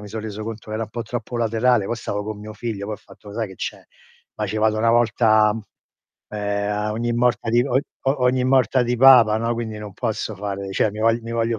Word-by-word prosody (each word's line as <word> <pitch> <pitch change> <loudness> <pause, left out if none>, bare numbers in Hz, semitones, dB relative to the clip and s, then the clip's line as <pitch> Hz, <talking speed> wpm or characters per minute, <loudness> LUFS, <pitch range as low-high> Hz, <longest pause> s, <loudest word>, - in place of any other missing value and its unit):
mi 105 - -9
sò 110 +2 -5
reso 110 0 -6
conto 110 -1 -7
era 110 +1 -2
un - - -14
po' 120 +1 -4
troppo 120 0 -5
laterale 115 -1 +2
poi 120 - -2
stavo 105 -2 -3
con 110 0 -5
mio 105 +1 -8
figlio, 110 -2 -5
poi 105 - -3
ho - - -10
fatto: 105 - -16
"Lo - - -10
sai 110 -1 -2
che 95 - -12
c'è? - - -5 0.5
Ma 105 - -2
ce 105 +2 -3
vado 110 0 +2
una 115 +1 +3
volta, 110 -2 +4 0.8
ehm, 100 -1 -2
uhm, - - -1
a 105 +1 -1
ogni 120 +2 -1
morta 120 -1 +1
di 120 +1 +4
è - - -4
o - - -4
o 135 0 -1
o 140 - -5
ogni 125 0 +2
morta 130 0 +3
di 120 +1 0
Papa, 120 -4 +7
no, 115 +1 0
quindi 110 -2 -4
non 105 -1 -8
posso 110 -1 -3
fare 100 0 -4
cioè 105 - +2
mi 105 - -7
vogl 115 +1 +3
mi 115 +1 -6
voglio 115 -1 0
110 Hz, 260 wpm, -22 LUFS, 105-120 Hz, 0.8 s, Papa